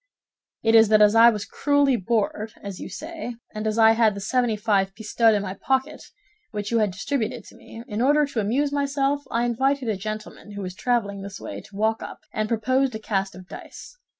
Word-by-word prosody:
"It 225 Hz, 0 st, +3 dB
is 225 Hz, -1 st, +7 dB
that 215 Hz, -1 st, +6 dB
as 210 Hz, 0 st, +5 dB
I 230 Hz, +1 st, +8 dB
was 210 Hz, -3 st, -3 dB
cruelly 285 Hz, -2 st, +2 dB
bored, 215 Hz, 0 st, -1 dB
as 200 Hz, -2 st, -7 dB
you -, -, -7 dB
say, 310 Hz, -, -7 dB, 0.2 s
and 215 Hz, 0 st, -3 dB
as 215 Hz, +1 st, -1 dB
I 225 Hz, -1 st, +7 dB
had 225 Hz, -2 st, +3 dB
the -, -, -5 dB
seventy 240 Hz, +2 st, 0 dB
five 200 Hz, -3 st, 0 dB
pistoles 220 Hz, 0 st, +2 dB
in 205 Hz, -, -1 dB
my 190 Hz, -1 st, -4 dB
pocket 265 Hz, +8 st, -2 dB, 0.4 s
which 210 Hz, -1 st, -5 dB
you 230 Hz, -, +3 dB
had 210 Hz, -2 st, +2 dB
distributed 230 Hz, +4 st, -3 dB
to -, -, -16 dB
me, 230 Hz, -, -11 dB
in 215 Hz, -2 st, -3 dB
order 290 Hz, +3 st, +4 dB
to 275 Hz, -5 st, -4 dB
amuse 255 Hz, +8 st, 0 dB
myself 280 Hz, 0 st, 0 dB
I 235 Hz, +1 st, 0 dB
invited 265 Hz, +1 st, 0 dB
a 215 Hz, -, 0 dB
gentleman 215 Hz, +1 st, -7 dB
who 200 Hz, -1 st, -5 dB
was 180 Hz, -1 st, -5 dB
traveling 200 Hz, -2 st, -1 dB
this 200 Hz, 0 st, -8 dB
way -, -, -7 dB
to 205 Hz, -, -16 dB
walk 220 Hz, +2 st, 0 dB
up, -, -, -8 dB
and 215 Hz, 0 st, -2 dB
proposed 255 Hz, +3 st, +1 dB
a -, -, -4 dB
cast 195 Hz, -3 st, -2 dB
of 185 Hz, -1 st, -12 dB
dice. -, -, -11 dB
225 Hz, 215 wpm, -24 LUFS, 205-255 Hz, 0.4 s, I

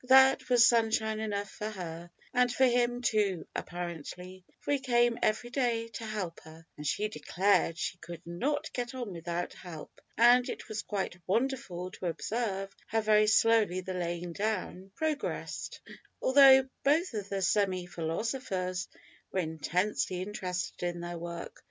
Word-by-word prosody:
That 265 Hz, +1 st, +6 dB
was 245 Hz, -2 st, +7 dB
sunshine 220 Hz, -2 st, +2 dB
enough 205 Hz, -2 st, -3 dB
for 215 Hz, -, -4 dB
her, 175 Hz, -4 st, -7 dB, 0.2 s
and 250 Hz, -1 st, +3 dB
for 260 Hz, +2 st, +4 dB
him 245 Hz, 0 st, +2 dB
too 205 Hz, -7 st, +1 dB
apparently, 180 Hz, +1 st, -6 dB, 0.2 s
for -, -, -3 dB
he 285 Hz, -, +3 dB
came 240 Hz, -2 st, +2 dB
every 230 Hz, +3 st, 0 dB
day 235 Hz, -3 st, 0 dB
to 230 Hz, 0 st, -6 dB
help 195 Hz, -6 st, -4 dB
her, 160 Hz, +1 st, -14 dB
(and 150 Hz, 0 st, -5 dB
she 210 Hz, +8 st, 0 dB
declared 175 Hz, 0 st, +1 dB
she 175 Hz, 0 st, -3 dB
could 170 Hz, 0 st, -9 dB
not 285 Hz, -, -2 dB
get 245 Hz, 0 st, -3 dB
on 240 Hz, -7 st, -4 dB
without 170 Hz, +1 st, -3 dB
help), 165 Hz, -4 st, -10 dB, 0.2 s
and 245 Hz, +2 st, +6 dB
it -, -, -6 dB
was 220 Hz, -2 st, -3 dB
quite 195 Hz, -4 st, -3 dB
wonderful 190 Hz, -5 st, -1 dB
to 185 Hz, -, -5 dB
observe 195 Hz, +2 st, -2 dB
how 225 Hz, 0 st, +1 dB
very 215 Hz, 0 st, +4 dB
slowly 220 Hz, -4 st, +4 dB
the 185 Hz, +1 st, -5 dB
laying 175 Hz, -1 st, -3 dB
down 195 Hz, -2 st, -2 dB
progressed, 310 Hz, -2 st, -3 dB, 0.4 s
although 265 Hz, -1 st, +7 dB, 0.2 s
both 310 Hz, +3 st, +3 dB
of 205 Hz, -2 st, -4 dB
the 195 Hz, -1 st, -1 dB
semi 185 Hz, -2 st, +2 dB
philosophers 185 Hz, +1 st, -2 dB, 0.4 s
were 190 Hz, -, +1 dB
intensely 180 Hz, +3 st, -1 dB
interested 185 Hz, -3 st, -4 dB
in 175 Hz, -1 st, -2 dB
their 175 Hz, 0 st, -5 dB
work. 170 Hz, 0 st, -7 dB
205 Hz, 150 wpm, -30 LUFS, 175-240 Hz, 0.4 s, was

